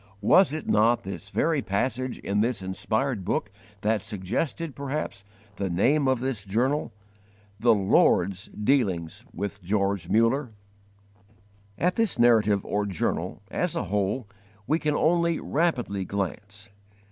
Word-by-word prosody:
Was 175 - +5
it 155 0 -5
not 115 +3 +3
this 100 +1 -7
very 160 +6 +1
passage 125 +5 -1
in 100 +1 -1
this 115 -3 -1
inspired 110 +4 -1
book 100 - -1 0.3
that 110 0 +1
suggested, 115 - -3
perhaps, 140 -8 -4 0.3
the 100 -1 -2
name 135 - +2
of 130 -2 +1
this 130 -6 -2
journal: 125 +9 0 0.7
"The 115 0 +5
Lord's 95 -1 +2
dealings 105 - 0
with 100 +1 -5
George 100 -1 -1
Muller"? 115 +3 +2 1.2
At 180 +1 +1
this 225 -5 +1
narrative 110 -4 +4
or 105 0 -1
journal, 95 -5 -2
as - - -1
a - - -1
whole, 105 +4 0 0.4
we 155 +5 +1
can 150 -2 0
only 170 +1 +2
rapidly 130 - 0
glance. 100 +2 -5
110 Hz, 130 wpm, -26 LUFS, 100-135 Hz, 1.2 s, Was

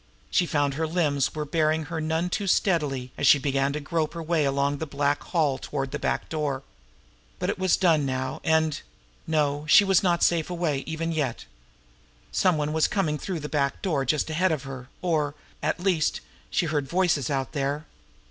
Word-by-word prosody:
She 175 - +2
found 145 -3 +1
her 160 +3 -1
limbs 155 -5 0
were 150 -1 -2
bearing 155 +1 +1
her 160 +1 -4
none 160 +3 -1
too 200 +1 -1
steadily, 145 -10 +1
as 140 - +2
she 145 - +8
began 140 0 0
to 150 - -2
grope 155 +2 -2
her 165 - -4
way 160 -2 +1
now - - +2
along 140 +1 0
the 160 - -3
black 145 0 0
hall 150 -6 +1
toward 135 -2 -4
the 150 - -3
back - - -1
door. 145 -4 -2 0.7
But - - -1
it - - -6
was 185 -1 +3
done 165 -5 +3
now, 130 -1 -3
and 160 -1 +2 0.5
No, 150 -2 +1
she 205 - +8
was 195 -2 +4
not 175 -2 +2
safe 170 -1 +2
away, 170 -5 -1
even 165 +1 -2
yet! 145 -7 -2 0.9
Some 180 -4 +2
one 150 0 -1
was 160 -1 +3
coming 180 -7 0
in 150 - -4
through 180 -5 -4
that 150 - -5
back 140 -2 -1
door 155 -8 +1
just 145 +3 +1
ahead 180 +3 +2
of 150 -4 -2
her; 130 -2 -8
or, 155 -5 0 0.3
at - - -1
least, 180 -4 +1 0.3
she - - +1
heard 150 -3 -1
voices 175 -8 +1
out 135 -2 -1
there. 145 +1 -2
155 Hz, 200 wpm, -26 LUFS, 140-165 Hz, 0.9 s, she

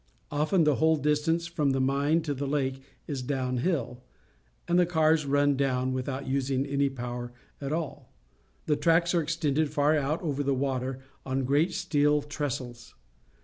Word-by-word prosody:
Often 155 +5 +2
the 150 -3 +3
whole 160 0 +4
distance 150 +3 +1
from 150 -5 0
the 135 - 0
mine 140 +5 +2
to 155 -2 -2
the 140 +1 -3
lake 135 -2 -1 0.2
is 140 -4 -4
down 130 -1 -2
hill, 130 -4 -1 0.7
and 175 +1 +3
the 180 - +5
cars 160 -3 +2
run 145 0 +3
down 130 -1 0
without 130 +1 -3
using 135 0 0
any 140 0 +1
power 120 -2 -5 0.3
at 140 0 -3
all. 155 -4 -4 0.5
The 150 - +2
tracks 170 +1 +3
are 170 - +3
extended 155 -1 0
far 145 +2 +2
out 150 +2 0
over 145 -3 -1
the 140 -1 +1
water 130 -1 -2 0.2
on 135 0 -1
great 145 +6 +2
steel 150 -5 +2
trestles. 130 -5 -5
145 Hz, 165 wpm, -28 LUFS, 135-155 Hz, 0.7 s, the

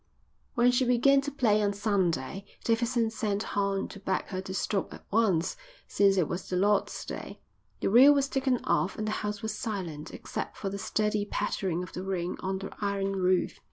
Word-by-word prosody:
When 245 +1 +5
she 245 +1 +2
began 255 +3 +4
to 285 +1 -4
play 220 -6 +2
on 205 -1 +1
Sunday 195 -4 0 0.2
Davidson 230 0 +1
sent 215 -2 -1
Horn 200 -1 0
to 200 - -10
beg 190 -1 -1
her 185 -1 -3
to 190 - -7
stop 195 0 -2
at - - -15
once 200 -6 +2 0.3
since 195 -1 +3
it 175 -5 +3
was 175 - -5
the 185 - -1
Lord's 205 +3 +1
day. - - -7 0.4
The - - +1
reel 260 +6 +9
was 280 -1 +3
taken 265 -2 0
off 185 - +1
and 215 - -2
the - - 0
house 210 0 -4
was 220 0 -2
silent 175 -9 -4
except - - -6
for 195 - -3
the 200 - -5
steady 210 +1 0
pattering 190 -4 -2
of 180 - -10
the 180 - -4
rain 185 -2 -2
on 190 0 -2
the 195 +1 -6
iron 195 -1 -1
roof. 185 -1 +1
200 Hz, 195 wpm, -29 LUFS, 190-225 Hz, 0.4 s, reel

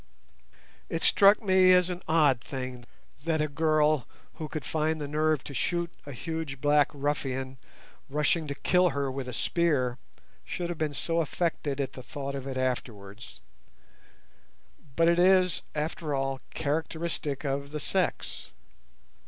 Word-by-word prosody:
It - - -2
struck 200 +2 +6
me 185 -2 +5
as 180 0 +4
an 180 0 -5
odd 150 -6 +4
thing 130 -1 -6 0.4
that 160 -1 0
a 150 - +1
girl 155 -2 +2 0.3
who 155 - -3
could 155 - -5
find 160 0 0
the 145 - -3
nerve 155 0 +1
to 140 - -8
shoot 170 +5 -1 0.2
a - - -5
huge 160 0 -5
black 145 +1 +4
ruffian 135 -2 -2 0.5
rushing 150 +3 +1
to 140 - -4
kill 180 +4 +3
her 140 -1 0
with 130 -1 -5
a - - -4
spear 130 -4 +1 0.4
should 175 -1 -4
have 175 - -4
been 150 -2 -1
so 165 +3 0
affected 155 -3 -2
at 140 - -2
the 130 - -8
thought 140 +2 -5
of 135 -1 -5
it 130 -1 -4
afterwards; 110 -5 -4 1.5
but 165 0 +4
it 170 0 +4
is, 185 -1 +4
after 150 -1 -2
all, 135 -1 -2
characteristic 155 -1 -2
of 140 0 -2
the 150 +1 -4
sex. - - -2
150 Hz, 150 wpm, -28 LUFS, 135-165 Hz, 1.5 s, struck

